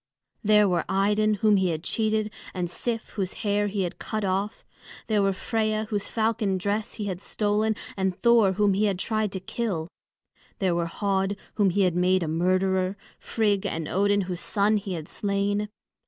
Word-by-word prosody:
There 210 -1 +5
were 175 -3 +1
Idun 210 +2 +2
whom 210 -2 +6
he 190 -1 +2
had 160 -1 -3
cheated, 215 0 0 0.2
and 175 -2 -2
Sif 230 +2 -3
whose 190 -3 -3
hair 205 0 +2
he 200 -1 -1
had 175 - -5
cut 215 -1 -3
off. 195 +3 -2 0.4
There 215 -2 +2
were 195 0 +3
Freia 215 +2 -1
whose 205 -2 -2
falcon 220 -3 0
dress 205 +3 -2
he 210 - -4
had 185 -2 -4
stolen 215 +1 0 0.2
and 190 -2 -1
Thor 230 -5 +5
whom 205 0 +3
he 205 +3 +2
had 200 -3 +1
tried 215 +1 -1
to 190 - -3
kill. 185 -4 -3 0.7
There 190 -5 +1
were 170 0 0
Höd 195 +2 -1 0.2
whom 205 -3 +3
he 200 +3 +1
had 180 -3 +2
made 180 +1 +3
a - - -2
murderer; 185 +3 +1 0.2
Frigg 205 -3 0
and 165 -2 -3
Odin 205 +2 +2
whose 180 -2 -4
son 210 +1 +2
he 200 -2 -4
had 160 -3 -5
slain. 205 +1 -1
200 Hz, 185 wpm, -26 LUFS, 185-215 Hz, 0.7 s, whom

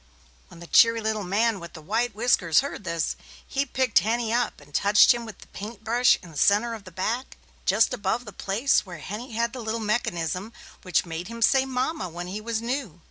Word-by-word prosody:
When - - -14
the 170 - -9
cheery 230 +6 +5
little 220 -1 -2
man 205 +3 +1
with 170 -1 -10
the 160 - -9
white 225 +5 -1
whiskers 210 -7 +3
heard 275 -7 -6
this, 170 -2 -1 0.3
he 275 +1 -1
picked 255 -2 +2
Henny 225 +1 -1
up 245 +1 0
and 145 0 -18
touched 205 - +6
him 235 -1 -6
with 220 - -9
the - - -14
paint 215 +2 -8
brush 240 +2 +4
in 170 - -12
the 150 - -5
center 215 +4 +3
of 215 -3 -9
the 185 - -11
back, 225 +9 -3 0.3
just 210 +6 +3
above 230 +2 -1
the 210 - -9
place 220 +8 +1
where 180 -4 -9
Henny 215 - -7
had 235 +1 0
the 255 - -6
little 220 0 -2
mechanism 210 -2 -2 0.3
which 180 -2 +1
made 170 +1 -5
him 230 +1 -3
say 265 +3 +4
"Mama" 255 - -2
when 175 +1 -6
he 195 +4 -5
was 225 0 -3
new. 235 - -3
220 Hz, 215 wpm, -25 LUFS, 185-235 Hz, 0.3 s, touched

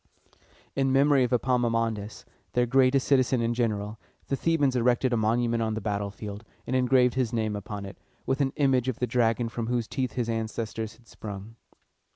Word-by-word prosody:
In 135 -1 +1
memory 140 0 +4
of 125 - -1
Epaminondas, 115 -4 0 0.3
their 125 0 +3
greatest 130 +1 +3
citizen 130 -2 +3
and 115 0 0
general, 110 -3 -2 0.3
the 135 - +1
Thebans 145 -3 +1
erected 125 +1 +2
a - - +4
monument 115 +1 +1
on 110 -1 -1
the - - -2
battlefield, 105 0 -4 0.2
and 130 - -2
engraved 125 -1 +4
his 125 -3 0
name 110 -3 -1
upon 100 0 -6
it, 95 - -10 0.3
with 135 +2 0
an 135 -1 +1
image 130 -3 +2
of 130 - -1
the 125 - 0
dragon 120 -1 +1
from 115 0 -4
whose 120 -2 -1
teeth 130 -3 -2
his 120 -2 -1
ancestors 110 -1 -3
had 115 0 -25
sprung. 105 +1 -8
120 Hz, 180 wpm, -27 LUFS, 110-130 Hz, 0.3 s, memory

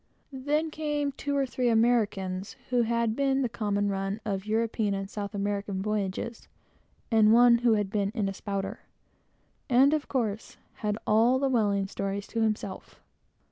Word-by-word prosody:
Then, 295 +4 -1
came 295 -2 -1
two 285 +1 -3
or 275 - +2
three 250 -1 0
Americans, 215 -4 +1 0.2
who 245 -1 +3
had 230 -1 0
been 275 0 +1
the - - +1
common 205 -3 -1
run 195 +1 -2
of 195 -1 -3
European 220 -2 0
and 195 0 -4
South 205 0 -6
American 200 -1 -2
voyages, 210 +2 -3 0.6
and 220 -1 +5
one 235 0 +6
who 240 -1 +3
had 205 -2 -1
been 200 -2 0
in 210 -4 0
a 195 - -3
"spouter," 195 0 -4 0.9
and, 265 +4 +5
of 305 -1 -1
course, 225 -5 -3 0.2
had 210 -1 -2
all 230 +4 +4
the 275 0 +1
whaling 205 -5 +1
stories 195 +1 -4
to 230 - -2
himself. 215 -3 -3
220 Hz, 160 wpm, -28 LUFS, 200-245 Hz, 0.9 s, one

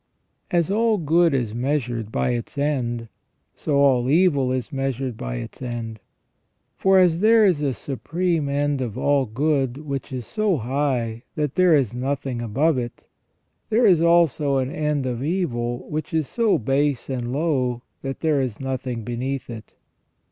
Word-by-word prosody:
As 175 +1 +1
all 225 +1 +2
good 170 0 +3
is 120 -6 -1
measured 120 -3 -2
by 125 - 0
its 120 +4 -4
end, 125 -5 -1 0.5
so 150 - -2
all 130 -3 +3
evil 145 -5 +3
is 130 +3 -3
measured 135 -2 -2
by - - -5
its - - -7
end. 115 -3 -5 0.8
For 190 0 +3
as 175 -3 +4
there 220 +2 +5
is 175 -7 +2
a 140 -2 +1
supreme 160 - -2
end 145 -1 0
of 120 -3 -4
all 140 -1 +2
good 135 +2 0
which 140 -3 -5
is 125 -3 -4
so 200 - 0
high 125 -2 -1
that 150 -3 -1
there 180 -3 +5
is 130 -6 +1
nothing 130 -1 -3
above 130 +6 +1
it, 120 -1 -7 0.6
there 230 +2 +3
is 180 -6 +5
also 165 -5 +3
an 130 0 -1
end 150 -3 -1
of 125 0 -3
evil 120 -8 -2
which 155 +2 -4
is 155 -4 +1
so 230 -3 +2
base 135 +2 0
and 125 -3 -3
low 130 -5 0 0.2
that 135 0 -5
there 155 -4 +2
is 125 -5 -3
nothing 130 -3 -3
beneath 125 +3 -4
it. 110 -2 -10
135 Hz, 160 wpm, -23 LUFS, 120-155 Hz, 0.8 s, there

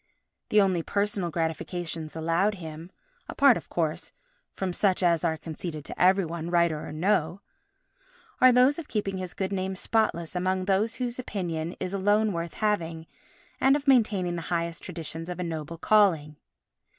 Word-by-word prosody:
The 210 - +5
only 185 -3 +2
personal 200 0 -1
gratifications 165 0 -3
allowed 165 +6 +1
him 165 0 -9 0.4
(apart, - - +5
of - - -7
course, - - -2 0.4
from 190 -2 -2
such 190 0 +1
as 170 -1 +3
are 160 -2 +1
conceded 155 -1 -6
to - - -6
every 190 +1 +5
one, 165 0 -5
writer 170 -3 +1
or - - -7
no) 175 +2 0 1.0
are 255 - +8
those 255 +5 +4
of 325 - -8
keeping 200 -3 -2
his 185 -1 -6
good 190 0 -2
name 190 0 -2
spotless 180 -5 0
among 185 +1 0
those 200 +4 +1
whose 250 -1 -3
opinion 175 -7 -3
is 185 0 -3
alone 205 +2 +2
worth 170 -1 -4
having 170 -7 -1 0.5
and 270 +1 +5
of 290 0 -3
maintaining 205 -9 +3
the - - -3
highest 170 -1 -2
traditions 165 -1 -6
of 180 - -5
a - - -1
noble 165 -1 -5
calling. 165 -6 +3
180 Hz, 165 wpm, -27 LUFS, 165-200 Hz, 1.0 s, are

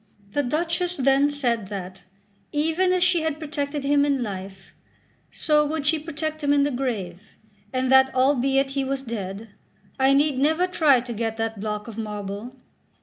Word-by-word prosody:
The 290 - +1
Duchess 335 +6 -1
then 275 +1 +3
said 240 -8 -1
that, 190 -2 -7 0.5
even 325 +5 +1
as 365 -1 +2
she 365 -2 +3
had 315 -2 -1
protected 295 -2 -4
him 285 0 +3
in 280 -3 +1
life, 190 -2 -8 0.6
so 300 -1 +2
would 300 0 -2
she 310 +1 +3
protect 310 0 -4
him 285 - +2
in 285 -1 +4
the 290 - 0
grave, 220 -7 -4 0.3
and 255 0 0
that 265 0 +6
albeit 270 +1 +2
he 275 0 -1
was 270 0 -2
dead, 215 -2 -6 0.5
I 265 +1 +4
need 285 -2 +2
never 315 +5 +3
try 305 -8 +3
to 240 -1 -6
get 225 0 -3
that 225 -1 -3
block 210 +1 -4
of 225 -1 -7
marble. 210 +3 -5
270 Hz, 170 wpm, -24 LUFS, 225-300 Hz, 0.6 s, that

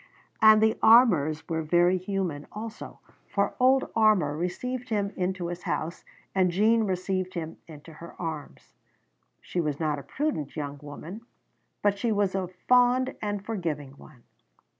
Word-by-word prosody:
And 215 0 +7
the 220 +1 +2
Armours 180 - +5
were 160 -1 -1
very 175 +3 +3
human 185 -6 -3
also, 220 +1 -8 0.3
for 200 -1 0
old 260 +1 +3
Armour 210 -10 +3
received 245 +10 -4
him 205 -2 0
into 185 -1 -2
his 175 +1 -5
house, 165 0 -3 0.3
and 185 -2 +3
Jean 220 +5 +3
received 185 -1 -2
him 165 -2 -5
into 160 0 -12
her 170 +2 -12
arms. 160 -4 -7 0.7
She 175 - -2
was 150 -3 -2
not 150 -3 -1
a - - -10
prudent 270 - -3
young 145 -2 -5
woman, 155 +8 -9 0.6
but 205 -1 +2
she 230 +2 0
was 205 -2 +1
a 190 -1 -1 0.2
fond 250 +1 +4
and 205 -1 -3
forgiving 160 -11 -3
one. 135 -3 -17
185 Hz, 150 wpm, -27 LUFS, 160-215 Hz, 0.7 s, And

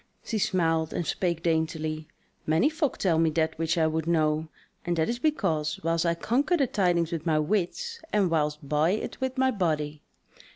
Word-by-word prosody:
She 220 - -2
smiled 165 -4 +1
and 175 - -2
spake 170 -2 -1
daintily: 160 -1 -1 0.4
"Many 160 - +3
folk 315 -3 -1
tell 170 -4 +2
me 165 -1 +4
that 160 -1 +1
which 165 +1 0
I 160 - +3
would 160 0 -1
know; 155 -1 +1 0.4
and 175 -1 -1
that 160 - +1
is 240 0 -2
because 170 - 0
whiles 165 +1 +1
I 170 0 +2
conquer 280 - +1
the 280 - +3
tidings 175 -7 +1
with 165 0 -4
my 155 -1 +3
wits, 210 - -1
and 200 -5 +2
whiles 150 -2 +1
buy 150 +3 +1
it 215 - -4
with 260 0 -2
my 260 0 +3
body. 155 - -1
165 Hz, 190 wpm, -27 LUFS, 160-205 Hz, 0.4 s, me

